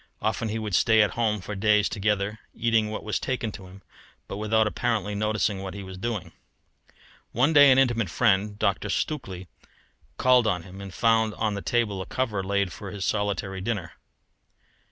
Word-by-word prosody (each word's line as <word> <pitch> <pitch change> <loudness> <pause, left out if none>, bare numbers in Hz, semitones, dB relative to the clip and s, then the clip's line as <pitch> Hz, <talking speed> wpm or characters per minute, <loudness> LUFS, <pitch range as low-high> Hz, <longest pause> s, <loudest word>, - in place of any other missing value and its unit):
Often 110 +1 -1
he 110 - -2
would 110 -3 -4
stay 110 +4 +5
at 105 - 0
home 110 -3 0
for 105 - -6
days 105 +1 +3
together, 105 0 -1 0.2
eating 115 -2 +1
what 110 - -5
was 105 - -1
taken 125 -4 -2
to 95 -3 -10
him, 95 +2 -14 0.4
but 100 - -6
without 110 +1 +2
apparently 105 -2 -1
noticing 105 -1 0
what 95 0 -6
he 100 - -6
was 95 0 -9
doing. 95 -4 -4 1.0
One 135 +7 +3
day 145 -2 +8
an 130 - +5
intimate 120 -7 +2
friend, 105 0 +1
Dr. - - 0
Stukely, 115 - -3 0.7
called 125 -2 +4
on 90 -5 0
him 95 +2 -11
and 100 -1 -8
found 110 +1 +2
on 110 -2 -1
the 100 - -4
table 105 -5 0
a - - -7
cover 110 -7 -2
laid 100 -2 0
for 100 +3 -8
his 95 -1 -4
solitary 100 -2 -2
dinner. 100 -4 -3
105 Hz, 180 wpm, -26 LUFS, 100-115 Hz, 1.0 s, day